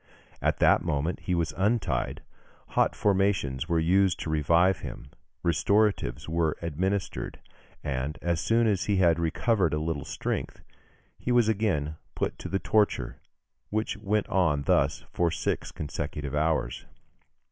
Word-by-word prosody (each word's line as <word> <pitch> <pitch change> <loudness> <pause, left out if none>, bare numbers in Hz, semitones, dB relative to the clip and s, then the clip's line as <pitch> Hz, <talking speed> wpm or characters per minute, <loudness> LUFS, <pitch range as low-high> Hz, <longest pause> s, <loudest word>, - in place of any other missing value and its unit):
] - - -29
At - - -17
that - - +4
moment 75 +5 -1
he 90 - -1
was 85 -1 -1
untied, 105 +4 0 0.5
hot - - +2
fomentations 95 -8 +1
were 85 - +2
used 90 +3 +3
to 80 - -3
revive 85 +5 +3
him, 65 - -8 0.3
restoratives 100 - +1
were 80 -1 0
administered, 95 +5 -2 0.4
and, 70 0 -2
as 85 -1 -1
soon 115 +1 +3
as 105 -4 +1
he 105 - +1
had 85 -3 +4
recovered 85 +1 +1
a - - -1
little 80 -2 -2
strength, - - -4 0.6
he 125 - -2
was 120 -2 +4
again 90 -9 0 0.2
put - - -2
to - - -6
the 95 - +1
torture, 105 +1 +1 0.5
which 110 +1 -1
went 105 0 -1
on 80 -7 +2
thus 70 +1 +1
for 85 -1 +2
six 80 - -2
consecutive 75 -1 -5
hours. 75 -4 0
85 Hz, 145 wpm, -28 LUFS, 75-100 Hz, 0.6 s, that